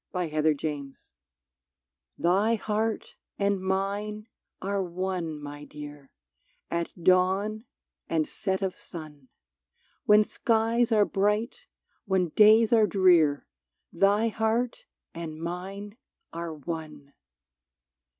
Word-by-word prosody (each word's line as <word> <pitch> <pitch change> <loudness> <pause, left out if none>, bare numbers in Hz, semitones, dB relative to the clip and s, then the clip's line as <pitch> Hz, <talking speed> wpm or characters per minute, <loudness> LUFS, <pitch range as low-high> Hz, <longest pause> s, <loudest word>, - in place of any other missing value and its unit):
93 155 -3 +1
CRADLE 150 0 -3
SONG - - -33 1.2
'THhy 200 +6 +3
heart 220 +1 -2 0.2
and 200 -1 +1
mine 200 +3 -2 0.3
are 200 +1 -1
one, 180 -3 -3
my 145 0 -8
dear, 145 -2 -10 0.6
At 170 0 -1
dawn 190 +5 +2 0.4
and 160 -2 +1
set 190 0 -2
of 190 -1 -1
sun; 150 -5 -10 0.8
When 210 0 +6
skies 230 +1 +1
are 210 -2 +5
bright, 210 - -1 0.4
when 190 -4 +1
days 220 +5 +6
are 220 -2 +5
drear, 175 -8 +4 0.5
Thy 205 +3 +3
heart 225 +3 -1 0.3
and 160 -2 -6
mine 195 +5 -6 0.4
are 170 0 -4
one 150 -2 -7
190 Hz, 100 wpm, -27 LUFS, 160-210 Hz, 1.2 s, When